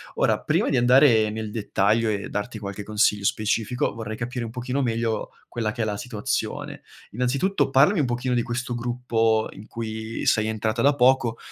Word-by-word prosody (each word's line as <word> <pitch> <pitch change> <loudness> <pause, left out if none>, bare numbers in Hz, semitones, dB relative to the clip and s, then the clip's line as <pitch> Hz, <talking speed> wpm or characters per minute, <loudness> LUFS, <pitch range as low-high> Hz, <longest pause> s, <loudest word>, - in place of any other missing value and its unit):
Ora, - - +1
prima - - +1
di - - +1
andare 120 -3 +5
nel 110 -1 -5
dettaglio 110 +1 +1
e 100 -1 -2
darti 105 +2 -4
qualche 100 0 -6
consiglio 105 -1 +1
specifico, 110 +4 0
vorrei 110 -1 -6
capire 125 0 -4
un 115 - -6
pochino 125 +3 -2
meglio, 115 -2 -1 0.2
quella 110 -2 -2
che 120 -1 -5
è - - +1
la 105 -1 -2
situazione. 110 -2 -3 0.3
Innanzitutto 135 - 0
parlami 150 +6 +4
un - - +1
pochino 125 +1 -1
di 120 - +1
questo 120 +1 -3
gruppo 115 -2 0
in 100 +3 -12
cui 110 0 -5
sei 110 0 +3
entrata 110 +1 -1
da 140 +1 +5
poco. 125 -3 +3
115 Hz, 175 wpm, -24 LUFS, 110-125 Hz, 0.3 s, andare